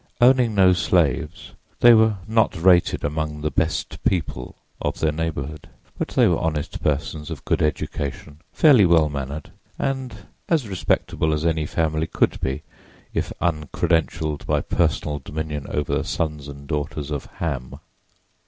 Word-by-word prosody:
Owning 125 Hz, -3 st, +5 dB
no 95 Hz, -2 st, +6 dB
slaves, 85 Hz, -2 st, 0 dB, 0.3 s
they 120 Hz, 0 st, +9 dB
were 110 Hz, -2 st, +4 dB
not 110 Hz, -6 st, +2 dB
rated 90 Hz, 0 st, +4 dB
among 75 Hz, 0 st, -2 dB
"the 75 Hz, 0 st, -1 dB
best 80 Hz, +1 st, -2 dB
people" 75 Hz, -8 st, -1 dB, 0.3 s
of -, -, -2 dB
their 80 Hz, -, +2 dB
neighborhood; 75 Hz, -2 st, -4 dB, 0.3 s
but -, -, -2 dB
they -, -, +3 dB
were -, -, +2 dB
honest 80 Hz, -3 st, -2 dB
persons 75 Hz, +1 st, -2 dB
of -, -, -7 dB
good -, -, +1 dB
education, 75 Hz, -1 st, -3 dB
fairly 140 Hz, -9 st, +6 dB
well 85 Hz, -4 st, +4 dB
mannered 70 Hz, +1 st, -5 dB, 0.3 s
and 130 Hz, -7 st, -3 dB, 0.2 s
as 155 Hz, -9 st, +2 dB
respectable 85 Hz, -4 st, 0 dB
as 75 Hz, +1 st, -1 dB
any 80 Hz, -2 st, +1 dB
family 80 Hz, -1 st, 0 dB
could -, -, +1 dB
be 65 Hz, +3 st, -2 dB, 0.5 s
if -, -, -2 dB
uncredentialed 80 Hz, -1 st, 0 dB
by -, -, +2 dB
personal 75 Hz, -1 st, 0 dB
dominion 75 Hz, 0 st, -5 dB
over 75 Hz, -1 st, -2 dB
the -, -, +1 dB
sons 75 Hz, -3 st, -3 dB
and 70 Hz, 0 st, -10 dB
daughters 75 Hz, 0 st, -3 dB
of 70 Hz, -2 st, -4 dB
Ham. 70 Hz, -7 st, -3 dB
80 Hz, 145 wpm, -23 LUFS, 75-90 Hz, 0.5 s, they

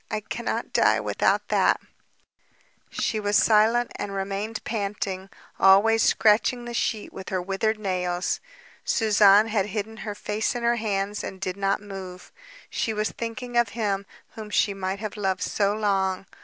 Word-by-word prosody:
I 215 Hz, -, -1 dB
cannot 235 Hz, +3 st, -4 dB
die -, -, +4 dB
without -, -, 0 dB
that...." -, -, +3 dB, 1.1 s
She 220 Hz, -, -1 dB
was 205 Hz, 0 st, 0 dB
silent, 225 Hz, +2 st, +4 dB
and 200 Hz, -1 st, -4 dB
remained 200 Hz, +3 st, -3 dB
panting, 200 Hz, -3 st, -3 dB, 0.3 s
always 210 Hz, +4 st, +6 dB
scratching 235 Hz, +3 st, +3 dB
the 240 Hz, -, -6 dB
sheet 220 Hz, -2 st, -2 dB
with 190 Hz, -, -8 dB
her 185 Hz, -, -1 dB
withered 195 Hz, +4 st, -1 dB
nails. 180 Hz, -3 st, -1 dB, 0.4 s
Suzanne 210 Hz, -1 st, +5 dB
had 210 Hz, -2 st, +1 dB
hidden 215 Hz, +2 st, -4 dB
her 210 Hz, -2 st, -5 dB
face 210 Hz, +3 st, -2 dB
in 240 Hz, -, -3 dB
her 235 Hz, 0 st, +2 dB
hands, 205 Hz, -2 st, -2 dB
and 190 Hz, -, -6 dB
did 185 Hz, -1 st, -3 dB
not 195 Hz, +1 st, 0 dB
move. 190 Hz, -3 st, -9 dB, 0.4 s
She 225 Hz, -, -2 dB
was 215 Hz, 0 st, -1 dB
thinking 240 Hz, +1 st, -6 dB
of 240 Hz, -2 st, +3 dB
him 200 Hz, -3 st, -1 dB, 0.2 s
whom 215 Hz, -1 st, -9 dB
she 205 Hz, 0 st, +2 dB
might 190 Hz, 0 st, -3 dB
have 215 Hz, +1 st, -6 dB
loved 190 Hz, -3 st, -1 dB
so 200 Hz, -1 st, +1 dB
long! 195 Hz, -3 st, 0 dB
205 Hz, 155 wpm, -25 LUFS, 195-220 Hz, 1.1 s, always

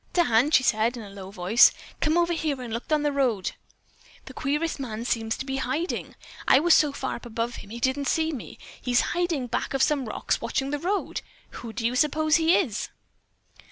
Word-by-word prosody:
"Dan," 270 Hz, -6 st, +3 dB
she 285 Hz, -4 st, +4 dB
said 230 Hz, +1 st, +1 dB
in 230 Hz, -, -7 dB
a 200 Hz, -, -11 dB
low 195 Hz, -1 st, -9 dB
voice, 195 Hz, +5 st, +5 dB, 0.3 s
"Come 315 Hz, +2 st, +2 dB
on 345 Hz, -, +5 dB
over 340 Hz, 0 st, -1 dB
here 310 Hz, -5 st, -2 dB
and 240 Hz, -3 st, -6 dB
look 235 Hz, -, -4 dB
down 305 Hz, -1 st, +2 dB
at -, -, -3 dB
the 295 Hz, -, +1 dB
road. 250 Hz, -9 st, 0 dB, 0.7 s
The 265 Hz, -, -10 dB
queerest 295 Hz, +5 st, -1 dB
man 230 Hz, -3 st, -5 dB
seems 225 Hz, -2 st, -1 dB
to -, -, -5 dB
be 270 Hz, 0 st, -3 dB
hiding. 285 Hz, +7 st, -3 dB, 0.3 s
I 265 Hz, -, +7 dB
was 340 Hz, +2 st, +4 dB
so 300 Hz, -2 st, +4 dB
far 270 Hz, -1 st, -4 dB
up 240 Hz, -, -14 dB
above 235 Hz, +1 st, -3 dB
him, -, -, -11 dB
he 235 Hz, +2 st, -7 dB
didn't 265 Hz, +3 st, 0 dB
see 320 Hz, +4 st, +1 dB
me. 270 Hz, -7 st, -8 dB, 0.2 s
He's 245 Hz, -1 st, +2 dB
hiding 345 Hz, -6 st, 0 dB
back 245 Hz, +3 st, -3 dB
of 270 Hz, -, +3 dB
some 290 Hz, -4 st, +1 dB
rocks -, -, -1 dB
watching 270 Hz, 0 st, -2 dB
the 290 Hz, -, -1 dB
road. 390 Hz, +6 st, -2 dB, 0.3 s
Who 230 Hz, -, -8 dB
do 225 Hz, 0 st, -4 dB
you 240 Hz, +2 st, +1 dB
suppose 310 Hz, +3 st, +3 dB
he 330 Hz, +1 st, +4 dB
is?" 245 Hz, -, -1 dB
265 Hz, 220 wpm, -26 LUFS, 235-310 Hz, 0.7 s, I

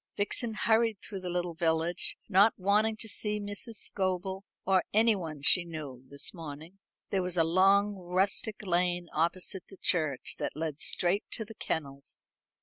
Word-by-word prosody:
Vixen 220 Hz, +2 st, -1 dB
hurried 225 Hz, 0 st, +3 dB
through 200 Hz, -3 st, -7 dB
the 180 Hz, -1 st, -4 dB
little 175 Hz, -1 st, -1 dB
village, 165 Hz, +1 st, 0 dB
not 205 Hz, +2 st, +5 dB
wanting 210 Hz, +3 st, +2 dB
to 220 Hz, -, -5 dB
see 210 Hz, 0 st, -2 dB
Mrs. 205 Hz, +3 st, -5 dB
Scobel, 190 Hz, -1 st, -2 dB, 0.2 s
or 190 Hz, -1 st, +4 dB
anyone 190 Hz, -10 st, +2 dB
she 180 Hz, -, +5 dB
knew, 150 Hz, -7 st, -7 dB
this 140 Hz, 0 st, -2 dB
morning. 160 Hz, +3 st, -9 dB, 0.3 s
There 195 Hz, -, +2 dB
was 180 Hz, -1 st, -1 dB
a 165 Hz, -, +6 dB
long 195 Hz, +5 st, +4 dB
rustic 190 Hz, +3 st, -1 dB
lane 175 Hz, -1 st, +1 dB
opposite 180 Hz, +4 st, -1 dB
the 195 Hz, -, -13 dB
church, 155 Hz, -8 st, 0 dB
that -, -, -3 dB
led 155 Hz, -1 st, -3 dB
straight 185 Hz, +4 st, +1 dB
to 220 Hz, -, -2 dB
the 225 Hz, -, -10 dB
kennels. 140 Hz, -8 st, -5 dB
185 Hz, 155 wpm, -30 LUFS, 165-205 Hz, 0.3 s, a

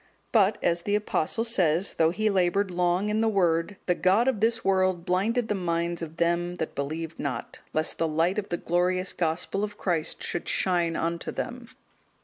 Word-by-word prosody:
But, 210 Hz, -2 st, +4 dB
as 170 Hz, 0 st, +1 dB
the 205 Hz, +4 st, 0 dB
Apostle 210 Hz, 0 st, 0 dB
says, 185 Hz, -5 st, +2 dB
though 160 Hz, -1 st, +3 dB
he 215 Hz, +5 st, 0 dB
laboured 190 Hz, +1 st, +1 dB
long 180 Hz, +3 st, +1 dB
in 215 Hz, +1 st, +1 dB
the 225 Hz, -, +3 dB
Word, 175 Hz, -1 st, +1 dB
"The 180 Hz, -, +3 dB
god 195 Hz, +7 st, +3 dB
of 260 Hz, -6 st, +1 dB
this 230 Hz, +1 st, +1 dB
world 185 Hz, -2 st, +2 dB
blinded 215 Hz, +6 st, +1 dB
the -, -, 0 dB
minds 170 Hz, -2 st, -1 dB
of 165 Hz, 0 st, -7 dB
them 170 Hz, +1 st, 0 dB
that 160 Hz, -, -4 dB
believed 160 Hz, +3 st, -4 dB
not, 140 Hz, -3 st, -4 dB
lest 155 Hz, 0 st, 0 dB
the 165 Hz, -, +2 dB
light 165 Hz, +6 st, +1 dB
of 200 Hz, -, -6 dB
the 175 Hz, -, -1 dB
glorious 180 Hz, +2 st, 0 dB
Gospel 170 Hz, +4 st, -1 dB
of 210 Hz, 0 st, -4 dB
Christ 165 Hz, -4 st, -1 dB
should 175 Hz, -, -2 dB
shine 175 Hz, -3 st, +1 dB
unto 170 Hz, +1 st, -2 dB
them." 245 Hz, -1 st, -5 dB
180 Hz, 185 wpm, -27 LUFS, 170-205 Hz, -, But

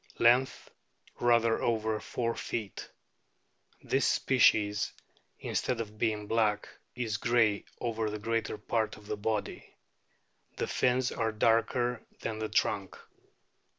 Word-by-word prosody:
Length, 125 Hz, +3 st, +3 dB, 0.5 s
rather 115 Hz, -1 st, +3 dB
over 110 Hz, -2 st, 0 dB
four 115 Hz, +1 st, -2 dB
feet. 105 Hz, -5 st, -5 dB, 0.9 s
This -, -, +1 dB
species, 105 Hz, -5 st, +3 dB, 0.5 s
instead 125 Hz, -, -1 dB
of 110 Hz, -1 st, -6 dB
being 110 Hz, -2 st, 0 dB
black, 105 Hz, -1 st, +1 dB, 0.3 s
is 115 Hz, -4 st, -2 dB
grey 115 Hz, -2 st, +2 dB
over 115 Hz, -2 st, -1 dB
the 105 Hz, -, -4 dB
greater 115 Hz, 0 st, -2 dB
part 110 Hz, +1 st, -1 dB
of 105 Hz, -, -15 dB
the 105 Hz, -, -3 dB
body; 105 Hz, 0 st, -3 dB, 0.8 s
the -, -, -1 dB
fins 125 Hz, 0 st, +1 dB
are 110 Hz, -1 st, -1 dB
darker 115 Hz, +2 st, +1 dB, 0.2 s
than 110 Hz, -1 st, -3 dB
the 110 Hz, -1 st, -3 dB
trunk. 100 Hz, -3 st, 0 dB
110 Hz, 120 wpm, -30 LUFS, 105-120 Hz, 0.9 s, Length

